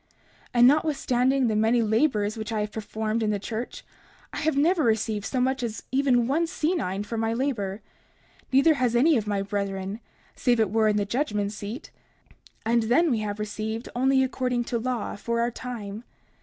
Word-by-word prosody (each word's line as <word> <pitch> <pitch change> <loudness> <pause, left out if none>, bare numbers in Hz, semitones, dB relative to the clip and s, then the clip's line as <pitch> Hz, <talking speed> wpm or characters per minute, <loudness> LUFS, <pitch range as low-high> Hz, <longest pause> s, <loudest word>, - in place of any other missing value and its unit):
30:33 - - -37 0.4
And 240 0 +7
notwithstanding 270 -3 +2
the 220 - 0
many 225 +2 +3
labors 220 -2 +1
which 220 0 -5
I 215 -1 0
have 210 0 -3
performed 220 +1 -3
in 215 - +1
the 210 - +1
church, 220 +4 -6 0.5
I - - -5
have 310 -2 0
never 325 +3 +3
received 220 -2 0
so 260 - -1
much 260 +1 +1
as 230 -3 -4
even 260 -3 +3
one 315 +7 +1
senine 300 - -1
for 225 +1 -4
my 225 0 0
labor; 220 -6 -2 0.7
neither 275 +5 +5
has 250 -5 0
any 300 +6 +5
of 215 -4 -1
my 200 -1 0
brethren, 195 0 -3 0.4
save 240 -2 +2
it 215 -4 +2
were 220 0 +3
in 210 -1 +2
the 205 - +1
judgment 210 -4 -1
seat; 210 +6 -7 0.7
and 235 +1 +3
then 270 +9 +3
we 230 - +1
have 210 -1 -3
received 215 +2 -4
only 265 +1 +3
according 250 -2 -1
to 235 0 -2
law 245 -2 -3
for 235 +3 -2
our 235 +1 +1
time. 225 -3 -7
230 Hz, 185 wpm, -26 LUFS, 210-260 Hz, 0.7 s, And